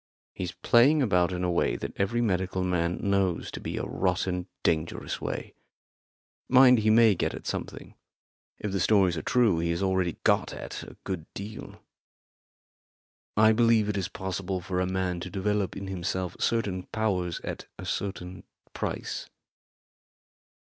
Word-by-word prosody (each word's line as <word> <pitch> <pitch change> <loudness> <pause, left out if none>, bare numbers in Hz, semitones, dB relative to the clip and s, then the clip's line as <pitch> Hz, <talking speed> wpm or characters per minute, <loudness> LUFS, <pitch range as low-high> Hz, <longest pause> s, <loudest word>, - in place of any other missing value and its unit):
He's 90 -2 -4
playing 135 +5 +4
about 90 -6 +2
in 90 0 -2
a 90 - +1
way 85 - +1
that - - -5
every 115 +5 0
medical 95 -3 0
man 90 -1 0
knows 100 -3 +1
to - - -6
be - - -5
a - - -2
rotten, 90 -1 -1 0.2
dangerous 80 0 -1
way. - - -4 1.0
Mind, 125 -1 +7
he 110 0 +2
may 110 -1 +6
get 90 - -1
at - - -9
something; - - -5 0.6
if 105 - -4
the 95 - -1
stories 95 -2 +4
are 80 - -3
true 115 -4 +3
he 85 0 0
has 85 +3 -1
already 95 -3 +1
got - - +2
at - - -6
a - - -11
good 85 -5 -5
deal. 105 +2 -8 1.6
I 110 +1 +7
believe 115 -2 +4
it 105 - -1
is 95 -3 -1
possible 95 0 -3
for 90 +1 -3
a 90 - 0
man 95 -1 -1
to 90 - -6
develop 100 0 -1
in 100 - -5
himself 95 -1 -3
certain 100 -6 0
powers 95 -6 -1
at - - -6
a - - -7
certain 90 -2 -4 0.3
price." - - -4
95 Hz, 155 wpm, -28 LUFS, 90-105 Hz, 1.6 s, Mind